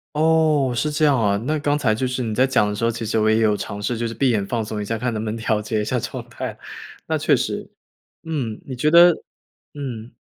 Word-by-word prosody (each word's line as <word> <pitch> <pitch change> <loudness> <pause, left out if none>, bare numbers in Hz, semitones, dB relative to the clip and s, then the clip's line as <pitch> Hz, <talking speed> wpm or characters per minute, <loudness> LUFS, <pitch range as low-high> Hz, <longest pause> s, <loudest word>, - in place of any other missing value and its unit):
哦， 155 -4 +3
是 150 +6 0
这 150 +1 +1
样 145 -2 +4
啊。 100 -2 +2
那 155 +2 0
刚 145 0 +1
才 110 -7 +2
就 130 +4 -1
是 125 0 -2
你 110 -2 -2
在 130 +4 +3
讲 120 -5 +2
的 105 - -2
时 105 - -4
候， 115 - +3
其 115 0 -4
实 110 +1 0
我 110 0 +3
也 110 - +4
有 110 -2 +3
尝 100 0 -5
试 110 +4 -2
就 115 +1 -1
是 115 - -5
闭 130 +3 +2
眼 105 -4 0
放 115 0 -2
松 105 0 -4
一 - - -4
下， 115 +2 -2
看 120 +1 -2
能 110 0 -3
不 110 - -3
能 110 - -3
调 110 -1 0
节 110 0 -1
一 - - -3
下 125 +3 0
状 120 +1 -6
态。 115 - -6 0.5
那 - - -1
确 - - +3
实， - - -3 0.5
嗯， 135 -10 -3
你 130 - -6
觉 135 +5 +1
得 170 +2 +8 0.6
嗯。 125 -6 -6
115 Hz, 285 characters per minute, -22 LUFS, 110-140 Hz, 0.6 s, 得